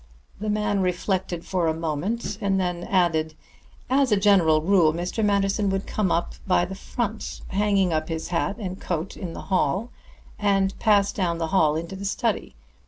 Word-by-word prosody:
The 215 Hz, -, -3 dB
man 210 Hz, -1 st, 0 dB
reflected 180 Hz, -1 st, -1 dB
for 180 Hz, -3 st, 0 dB
a 160 Hz, -, +1 dB
moment, 165 Hz, +8 st, -3 dB
then 185 Hz, -3 st, 0 dB
added: 160 Hz, -4 st, +1 dB, 0.5 s
"As 265 Hz, -1 st, +2 dB
a 210 Hz, -, +5 dB
general 180 Hz, -6 st, +4 dB
rule, 175 Hz, -4 st, +4 dB
Mr. 180 Hz, +6 st, -2 dB
Manderson 200 Hz, 0 st, +2 dB
would 195 Hz, 0 st, -1 dB
come 210 Hz, -4 st, -1 dB
in 170 Hz, -, +2 dB, 0.2 s
by 180 Hz, -1 st, +3 dB
the 190 Hz, -, -7 dB
front, 220 Hz, +2 st, -4 dB
hang 195 Hz, -2 st, +2 dB
up 155 Hz, +1 st, -1 dB
his 160 Hz, -1 st, -4 dB
hat 180 Hz, +3 st, 0 dB
and 190 Hz, -4 st, -6 dB
coat 175 Hz, +1 st, -3 dB
in 175 Hz, -3 st, -6 dB
the -, -, -7 dB
hall, 190 Hz, -, +1 dB, 0.5 s
and 195 Hz, -2 st, +2 dB
pass 205 Hz, -2 st, +3 dB
down 175 Hz, -4 st, 0 dB
the 165 Hz, -1 st, -2 dB
hall 155 Hz, -5 st, +4 dB
into 170 Hz, +4 st, -4 dB
the 195 Hz, +1 st, -6 dB
study. 195 Hz, -, -1 dB
190 Hz, 170 wpm, -24 LUFS, 170-200 Hz, 0.5 s, a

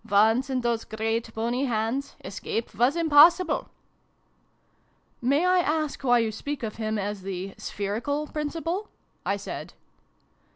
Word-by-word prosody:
Once 220 Hz, +6 st, +4 dB
in 260 Hz, -1 st, 0 dB
those 235 Hz, -1 st, 0 dB
great 225 Hz, +1 st, -2 dB
bony 240 Hz, +4 st, 0 dB
hands, 240 Hz, +3 st, -1 dB
escape 225 Hz, 0 st, -4 dB
was 245 Hz, +8 st, +3 dB
impossible! 335 Hz, +2 st, +5 dB, 0.5 s
" -, -, -41 dB
" -, -, -40 dB, 0.3 s
May 280 Hz, +7 st, +2 dB
I 365 Hz, 0 st, +4 dB
ask 310 Hz, -4 st, -1 dB
why 245 Hz, -2 st, +5 dB
you 230 Hz, -2 st, +1 dB
speak 285 Hz, +5 st, -5 dB
of 215 Hz, -2 st, -4 dB
him 220 Hz, -1 st, -1 dB
as 205 Hz, 0 st, -3 dB
the 190 Hz, 0 st, -5 dB
' -, -, -36 dB
spherical' 230 Hz, +9 st, -2 dB
Principal?" 330 Hz, +7 st, -3 dB, 0.4 s
I -, -, +1 dB
said. -, -, -7 dB
245 Hz, 150 wpm, -26 LUFS, 220-295 Hz, 0.5 s, impossible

